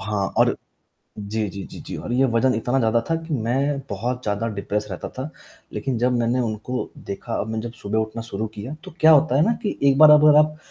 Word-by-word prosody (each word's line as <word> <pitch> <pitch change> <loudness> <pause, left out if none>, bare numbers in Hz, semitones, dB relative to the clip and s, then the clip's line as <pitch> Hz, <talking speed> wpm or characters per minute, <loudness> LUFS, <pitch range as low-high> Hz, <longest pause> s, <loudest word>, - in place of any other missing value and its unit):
हाँ, 105 -2 -1
और - - +3 0.6
जी, 105 +1 -3
जी, 100 +1 -7
जी, - - -9
जी। - - -7
और - - -6
ये 130 +2 +3
वज़न 125 +3 +2
इतना 120 +4 0
ज़्यादा 115 -1 +2
था - - +3
कि 160 -2 -3
मैं 135 +4 0
बहुत 125 +5 -3
ज़्यादा 105 +1 -2
डिप्रेस्ड 105 +1 -3
रहता 90 - -5
था, 130 +4 -7 0.4
लेकिन 135 -3 -2
जब 125 +2 +2
मैंने 120 +2 +1
उनको 115 +2 -3 0.2
देखा 100 - -5
अब 110 - -4
मैं 110 0 -2
जब 115 +1 -6
सुबह 110 -1 -3
उठना 110 +1 -3
शुरू 110 -1 -4
किया, 110 +8 -6
तो - - -9
क्या 160 - +7
होता 150 -2 +4
है 145 - +4
ना 230 - +2
कि 210 - -2
एक 135 0 +3
बार 155 0 +9
अगर 150 0 +7
आप 155 0 +3
120 Hz, 230 wpm, -22 LUFS, 110-135 Hz, 0.6 s, बार